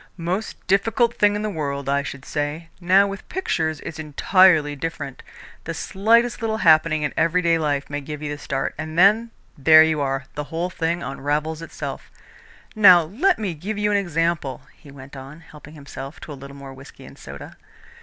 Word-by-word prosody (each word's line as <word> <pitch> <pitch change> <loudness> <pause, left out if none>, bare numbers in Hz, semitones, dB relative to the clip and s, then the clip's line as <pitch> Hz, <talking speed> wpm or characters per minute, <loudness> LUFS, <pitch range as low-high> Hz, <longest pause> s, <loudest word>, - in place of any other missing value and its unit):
"Most 180 +5 -4
difficult 225 +5 +2
thing 205 -2 +2
in 210 - -3
the 215 - -1
world, 140 -5 -4
I 140 +1 +1
should 140 -1 -8
say. 150 +3 -4
Now 185 +3 +4
with 195 -1 -7
pictures 160 - -2
it's 160 - -8
entirely 155 0 +3
different. 145 -3 -6 0.4
The 165 - -4
slightest 230 +8 +1
little 220 -1 -1
happening 155 -4 +4
in 145 - -2
everyday 165 0 +2
life 145 -3 -1
may 145 0 -4
give 150 +1 -7
you 150 - -3
the 145 - -6
start, 135 -1 -3
and 155 +1 -6
then, 210 +6 +4 0.3
there 155 +3 +8
you 160 -2 0
are 135 -1 -1
the 150 0 -5
whole 170 +4 -4
thing 170 0 -2
unravels 150 +3 -3
itself. 165 - -7 0.7
Now 185 -5 +7
let 270 - +1
me 205 -5 -3
give 195 +7 -5
you 210 0 0
an 205 - +3
example," 165 -6 -1
he 150 - -17
went 140 0 -12
on, 135 +4 -11
helping 150 -1 -14
himself 140 0 -9
to - - -9
a - - -5
little 140 0 -11
more 135 -1 -10
whisky 135 +1 -14
and - - -13
soda. - - -11
160 Hz, 185 wpm, -22 LUFS, 145-190 Hz, 0.7 s, there